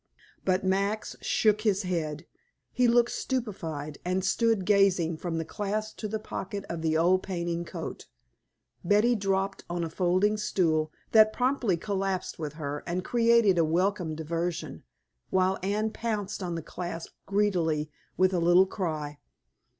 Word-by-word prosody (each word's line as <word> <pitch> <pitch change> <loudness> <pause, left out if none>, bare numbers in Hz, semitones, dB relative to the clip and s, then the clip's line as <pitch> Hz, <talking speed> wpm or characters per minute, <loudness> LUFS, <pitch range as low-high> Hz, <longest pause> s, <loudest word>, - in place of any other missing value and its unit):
But 185 0 +1
Max 200 +3 0
shook 215 -1 +2
his 210 -2 +1
head; 165 -3 -3 0.5
he 250 -1 +3
looked 240 0 +4
stupefied, 165 - -4
and 185 +1 -1
stood 220 0 +2
gazing 190 -5 +3
from 165 0 -3
the 165 - -2
clasp 215 +3 -3
to 215 - -4
the 220 +1 -2
pocket 200 -2 -5
of 170 - -4
the 160 -1 +1
old 180 +3 +4
painting 170 -2 -3
coat. - - -7 0.8
Betty 210 +6 +4
dropped 195 -2 -1
on 175 0 -2
a 165 - -4
folding 185 +5 +2
stool, 165 -7 +1 0.2
that 215 -1 +7
promptly 250 -6 +1
collapsed 195 -1 -2
with 150 -2 -4
her 145 -2 -5
and 180 +1 -2
created 230 -6 +4
a - - +5
welcome 175 0 0
diversion, 165 - -3 0.5
while 190 0 +2
Anne 210 +3 0
pounced 210 -4 -3
on 175 -2 -3
the 165 - -4
clasp 170 0 -6
greedily, 170 -7 +1 0.3
with 185 +1 +3
a 180 - +2
little 175 +2 +5
cry. 155 -7 -4
185 Hz, 150 wpm, -28 LUFS, 170-210 Hz, 0.8 s, that